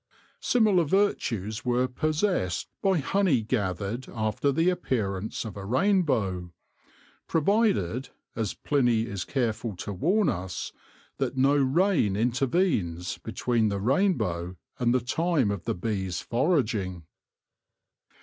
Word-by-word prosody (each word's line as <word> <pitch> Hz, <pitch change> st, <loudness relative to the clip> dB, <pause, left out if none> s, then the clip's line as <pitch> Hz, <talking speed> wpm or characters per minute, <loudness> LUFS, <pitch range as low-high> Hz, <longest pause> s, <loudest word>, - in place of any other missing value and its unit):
Similar 215 Hz, -7 st, +3 dB
virtues 115 Hz, -, 0 dB
were 125 Hz, +1 st, +1 dB
possessed 155 Hz, -, -1 dB
by 195 Hz, -2 st, +3 dB
honey 165 Hz, -, +2 dB
gathered 105 Hz, +1 st, -2 dB
after 110 Hz, +5 st, 0 dB
the 165 Hz, +6 st, +2 dB
appearance 110 Hz, -, -2 dB
of 110 Hz, -, -7 dB
a 100 Hz, -, -7 dB
rainbow, 115 Hz, -, +1 dB, 0.8 s
provided 160 Hz, -, +1 dB
— -, -, -49 dB
as 110 Hz, -3 st, -2 dB
Pliny 120 Hz, -6 st, +1 dB
is 100 Hz, -6 st, -4 dB
careful 115 Hz, -5 st, -2 dB
to 95 Hz, +3 st, -5 dB
warn 180 Hz, -, +2 dB
us 90 Hz, 0 st, -3 dB, 0.2 s
— -, -, -31 dB
that 135 Hz, -, -1 dB
no 135 Hz, +2 st, +4 dB
rain 140 Hz, -, +2 dB
intervenes 115 Hz, -, 0 dB
between 115 Hz, 0 st, 0 dB
the 100 Hz, -1 st, -2 dB
rainbow 100 Hz, -, 0 dB, 0.2 s
and 120 Hz, -2 st, +2 dB
the 130 Hz, 0 st, +2 dB
time 140 Hz, -2 st, +1 dB
of 100 Hz, -4 st, -5 dB
the -, -, -1 dB
bees' 95 Hz, -1 st, -2 dB
foraging. 115 Hz, -, 0 dB
120 Hz, 120 wpm, -27 LUFS, 100-155 Hz, 0.8 s, no